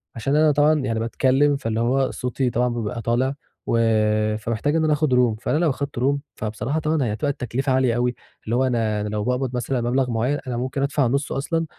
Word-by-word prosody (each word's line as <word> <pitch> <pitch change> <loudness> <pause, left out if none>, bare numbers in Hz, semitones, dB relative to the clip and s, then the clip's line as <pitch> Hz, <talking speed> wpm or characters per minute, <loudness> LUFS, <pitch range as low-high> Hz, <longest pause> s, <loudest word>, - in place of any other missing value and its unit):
عشان 135 +5 -1
أنا 155 0 +5
طبعًا 150 +2 +3
يعني 115 -5 -1
باتكلّم 135 +5 +2
فاللي 115 -4 -2
هو 130 +3 +1
صوتي 125 +1 -2
طبعًا 125 +1 +1
بيبقى 115 -1 -3
طالع، 120 +4 0 0.3
و 115 - +1 0.6
فمحتاج 115 +7 -1
إن 160 - +2
أنا 155 -1 +3
آخد 150 -2 +1
Room، 125 -3 +3
فأنا 145 - 0
لو 165 0 +2
أخدت 140 -2 -3
Room 140 +3 +2 0.2
فبصراحة 110 +8 -3
طبعًا 155 -1 0
هي 110 -4 -1
هتبقى 145 +6 -1
التكلفة 135 0 -2
عالية 130 -2 +2
أوي، 120 0 0 0.3
اللي 115 - -1
هو 130 - +2
أنا 110 -4 0
أنا 105 - -3
لو 105 0 -2
باقبض 125 +1 -1
مثلًا 125 +1 -1
مبلغ 125 +2 0
معيّن، 125 +6 0
أنا 125 -2 -2
ممكن 130 +3 -2
أدفع 140 -1 +1
نُصّه 140 +4 -1
أصلًا، 165 +4 -1
130 Hz, 215 wpm, -22 LUFS, 115-140 Hz, 0.6 s, أنا